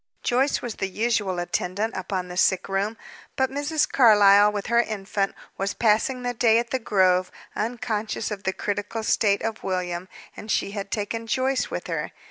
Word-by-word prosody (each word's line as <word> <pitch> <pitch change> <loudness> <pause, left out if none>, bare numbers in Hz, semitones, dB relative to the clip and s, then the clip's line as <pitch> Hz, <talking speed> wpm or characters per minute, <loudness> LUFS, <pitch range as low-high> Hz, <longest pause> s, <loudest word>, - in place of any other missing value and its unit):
Joyce 265 +4 +1
was 240 -3 -5
the 195 - -1
usual 205 -2 0
attendant 180 +5 -2
upon 185 0 -3
the 180 - -8
sick 185 0 +2
room; 200 +3 -1 0.4
but 265 0 +1
Mrs. 290 +3 0
Carlyle, 205 -4 +6
with 205 -1 -4
her 235 +1 +3
infant, 200 -3 -2 0.2
was 195 +1 -1
passing 235 +3 +2
the 245 0 -1
day 225 -1 +4
at 235 0 -1
the 260 - 0
Grove; 185 -5 +2 0.3
unconscious 225 -2 -2
of 205 -2 -4
the 190 - 0
critical 205 +3 -3
state 205 -2 +2
of 225 -1 -3
William, 180 -1 -2 0.3
and 215 - -10
she 200 - 0
had 200 -1 -5
taken 225 +2 -3
Joyce 260 +3 0
with - - -5
her. - - -3
210 Hz, 175 wpm, -24 LUFS, 195-235 Hz, 0.4 s, Carlyle